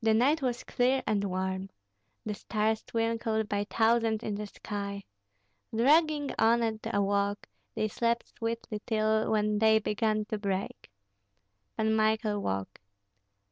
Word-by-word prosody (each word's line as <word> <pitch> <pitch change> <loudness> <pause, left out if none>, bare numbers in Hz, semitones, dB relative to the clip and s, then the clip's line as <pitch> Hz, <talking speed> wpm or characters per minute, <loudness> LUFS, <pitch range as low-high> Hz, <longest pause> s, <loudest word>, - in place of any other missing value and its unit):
The 220 -1 +4
night 285 +7 +3
was 245 -2 -1
clear 255 +2 +1
and 205 -2 +1
warm; 190 0 -2 0.6
the 215 - -2
stars 215 +1 -1
twinkled 225 -1 -1
by 205 0 -1
thousands 225 -1 +2
in 215 - -2
the 210 +1 -4
sky. 200 -1 -5 0.7
Dragging 295 +4 +3
on 230 +1 +4
at 220 -1 -1
a 200 -3 +2
walk, 200 +1 0 0.3
they 215 - 0
slept 235 +2 -1
sweetly 230 -2 -4
till, 220 -1 +1
when 210 -1 +1
day 220 0 +5
began 215 0 0
to 215 - -2
break. 195 - -3 0.9
Pan 220 0 +2
Michael 215 -1 +1
woke. 95 - -3
220 Hz, 140 wpm, -29 LUFS, 205-230 Hz, 0.9 s, day